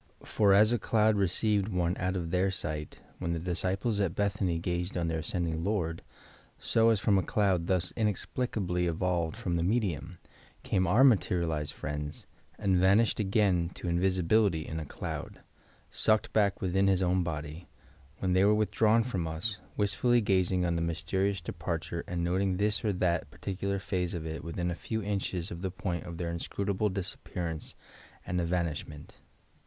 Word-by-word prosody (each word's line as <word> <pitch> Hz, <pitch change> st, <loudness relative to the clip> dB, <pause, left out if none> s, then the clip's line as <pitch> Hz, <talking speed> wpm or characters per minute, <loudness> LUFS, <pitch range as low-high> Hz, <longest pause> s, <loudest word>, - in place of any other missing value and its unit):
For 105 Hz, -2 st, +3 dB
'as 105 Hz, +3 st, +6 dB
a 120 Hz, -, +1 dB
cloud 110 Hz, -1 st, +3 dB
received 100 Hz, +1 st, +1 dB
one 90 Hz, -3 st, 0 dB
out 95 Hz, 0 st, -1 dB
of 85 Hz, -3 st, -3 dB
their 95 Hz, +2 st, +2 dB
sight' 75 Hz, -5 st, -5 dB, 0.2 s
when 85 Hz, -2 st, -1 dB
the 85 Hz, -, -2 dB
disciples 95 Hz, +5 st, -1 dB
at 95 Hz, -4 st, 0 dB
Bethany 100 Hz, -4 st, 0 dB
gazed 90 Hz, +2 st, -2 dB
on 85 Hz, -1 st, 0 dB
their 80 Hz, -1 st, -1 dB
ascending 80 Hz, 0 st, -2 dB
Lord, 85 Hz, -5 st, -1 dB, 0.6 s
so, 115 Hz, 0 st, +3 dB
as 110 Hz, -3 st, +3 dB
from 100 Hz, -2 st, +3 dB
a -, -, +2 dB
cloud 95 Hz, -3 st, +1 dB
thus 90 Hz, -2 st, +1 dB
inexplicably 105 Hz, -4 st, -1 dB
evolved 85 Hz, -1 st, 0 dB
from 85 Hz, -2 st, -1 dB
the 85 Hz, -, 0 dB
medium, 90 Hz, -, -1 dB, 0.5 s
came 95 Hz, -2 st, +1 dB
our 110 Hz, +9 st, +5 dB
materialized 85 Hz, -, +2 dB
friends, 75 Hz, +1 st, -5 dB, 0.3 s
and 95 Hz, -3 st, +2 dB
vanished 100 Hz, +6 st, +4 dB
again 95 Hz, -4 st, +2 dB
to -, -, -6 dB
invisibility 90 Hz, 0 st, +2 dB
in 80 Hz, -, -4 dB
a 80 Hz, -, -5 dB
cloud -, -, -6 dB, 0.5 s
(sucked 110 Hz, -1 st, +1 dB
back 100 Hz, -2 st, +2 dB
within 95 Hz, +1 st, +2 dB
his 95 Hz, -1 st, +3 dB
own 90 Hz, +1 st, +2 dB
body) 80 Hz, 0 st, -5 dB, 0.5 s
when 95 Hz, -1 st, 0 dB
they 95 Hz, +1 st, +4 dB
were 105 Hz, +1 st, +5 dB
withdrawn 110 Hz, +2 st, +3 dB
from 95 Hz, -9 st, -2 dB
us, 90 Hz, +6 st, -3 dB, 0.2 s
wist 100 Hz, -2 st, 0 dB
fully 120 Hz, +7 st, +3 dB
gazing 95 Hz, -3 st, +2 dB
on 85 Hz, -1 st, 0 dB
the 85 Hz, -, 0 dB
mysterious 85 Hz, +4 st, -1 dB
departure 85 Hz, 0 st, -4 dB
and 85 Hz, -1 st, -2 dB
noting 90 Hz, +2 st, +1 dB
this 105 Hz, +2 st, 0 dB
or 105 Hz, -, +2 dB
that 90 Hz, -2 st, 0 dB
particular 100 Hz, +1 st, -3 dB
phase 95 Hz, -3 st, -2 dB
of 80 Hz, -2 st, -4 dB
it 80 Hz, 0 st, -5 dB
within 85 Hz, +1 st, -2 dB
a -, -, -1 dB
few 110 Hz, +4 st, -4 dB
inches 95 Hz, -4 st, -2 dB
of 85 Hz, -, -6 dB
the 95 Hz, -, -1 dB
point 90 Hz, -1 st, -4 dB
of 85 Hz, -1 st, -7 dB
their 85 Hz, -1 st, -2 dB
inscrutable 100 Hz, +4 st, -1 dB
disappearance 90 Hz, -3 st, -5 dB, 0.5 s
and 90 Hz, 0 st, -1 dB
evan 85 Hz, 0 st, +1 dB
ishment. 75 Hz, -1 st, -6 dB
90 Hz, 170 wpm, -30 LUFS, 85-100 Hz, 0.6 s, as